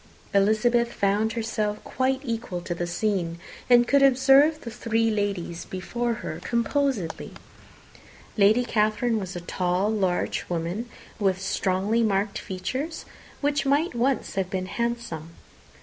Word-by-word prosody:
Elizabeth 235 +4 +3
found 210 +1 +1
herself 220 -2 -2
quite 260 0 0
equal 230 -7 -3
to 175 0 -4
the 175 0 -3
scene, 175 -2 -1 0.3
and 240 -1 +6
could 280 +2 +4
observe 275 +3 +5
the 235 - -7
three 225 -1 0
ladies 200 -5 -2
before 235 +6 -3
her - - -4
composedly. 235 - -1 1.0
Lady 215 +4 +4
Catherine 215 +1 +1
was 190 -2 -6
a 175 - -4
tall, 180 +3 0
large 190 -5 0
woman, 175 +7 -3 0.3
with 190 -3 +1
strongly 195 +3 0
marked 200 -1 0
features, 255 - -4 0.4
which 290 0 +1
might 290 +5 +2
once 250 +3 0
have 195 -2 -1
been 185 -2 -2
handsome. 210 -8 -4
215 Hz, 130 wpm, -25 LUFS, 190-240 Hz, 1.0 s, and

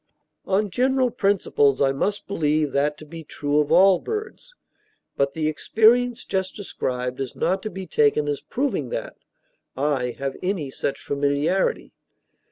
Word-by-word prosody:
On 200 +1 +1
general 260 +2 +2
principles, 195 - +2
I 135 -1 +3
must 200 +10 -2
believe 155 -5 0
that 150 +2 0
to 155 - -11
be 165 +2 -9
true 145 0 -1
of 150 -1 0
all 190 -1 +6
birds. 445 +3 -6 0.6
But 140 0 0
the 155 -1 0
experience 230 +9 +3
just 190 -1 -2
described 125 - -4
is 135 -2 -4
not 190 +3 0
to 215 - -4
be 190 -1 -7
taken 150 -2 +2
as 145 -2 -2
proving 275 +2 -2
that - - -5 0.6
I 130 -4 0
have 135 -1 -4
any 180 -7 -2
such 135 - -3
familiarity. 145 +6 0
160 Hz, 150 wpm, -23 LUFS, 140-205 Hz, 0.6 s, all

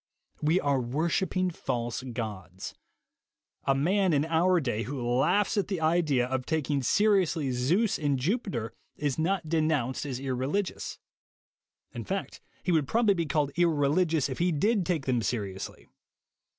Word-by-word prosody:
We 160 +5 +3
are 140 -4 +1
wor 145 +8 -1
shipping 185 0 0
false 120 -7 -3
gods. 105 -8 -6 0.9
A 135 - +3
man 185 +5 +2
in 145 +1 +2
our 170 +3 +3
day 120 -7 -1
who 130 +5 -4
laughs 135 - +2
at 200 - +1
the 190 -4 -2
idea 155 -6 +2
of 130 0 -3
taking 150 -3 0
seriously 180 - +2
Zeus 165 - +1
and 145 -3 +1
Jupiter 135 - -2 0.2
is 145 -1 -1
not 170 +1 0
denounced 155 -5 0
as 130 -2 -3
irreligious; 135 +9 -2 1.0
in - - -5
fact, - - -4 0.2
he 180 - 0
would 155 -5 +2
probably 225 -3 +3
be 170 -4 -2
called 145 -1 +1
irreligious 160 -2 +2
if 130 - -5
he 175 +1 +2
did 195 +5 +1
take 165 -7 0
them 125 -3 +1
seriously. 100 -5 -4
150 Hz, 150 wpm, -28 LUFS, 130-175 Hz, 1.0 s, We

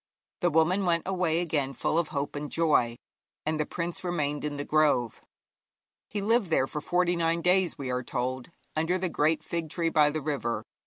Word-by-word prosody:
The 175 - +2
woman 175 +5 +2
went 170 -1 +2
away 180 -3 +1
again 145 -5 -1
full 160 - +1
of 170 - 0
hope 140 0 -3
and 145 0 -5
joy, 150 -8 +2 0.5
and 155 0 -1
the 150 - 0
prince 170 +1 -4
remained 150 -5 -1
in 150 -1 -3
the 145 - -4
grove. 150 -7 +2 0.9
He 205 - -3
lived 220 -1 +2
there 145 -5 +3
for 150 +2 -5
forty 175 +2 +1
nine 165 0 0
days, 180 -1 +3
we 135 -3 -4
are 125 0 0
told, 125 +2 -3 0.3
under 165 +4 +1
the 185 -1 -1
great 155 0 +1
fig 165 -1 -3
tree 165 +1 0
by 150 -2 +4
the 155 +1 -3
river. 120 -7 -2
160 Hz, 195 wpm, -28 LUFS, 145-175 Hz, 0.9 s, by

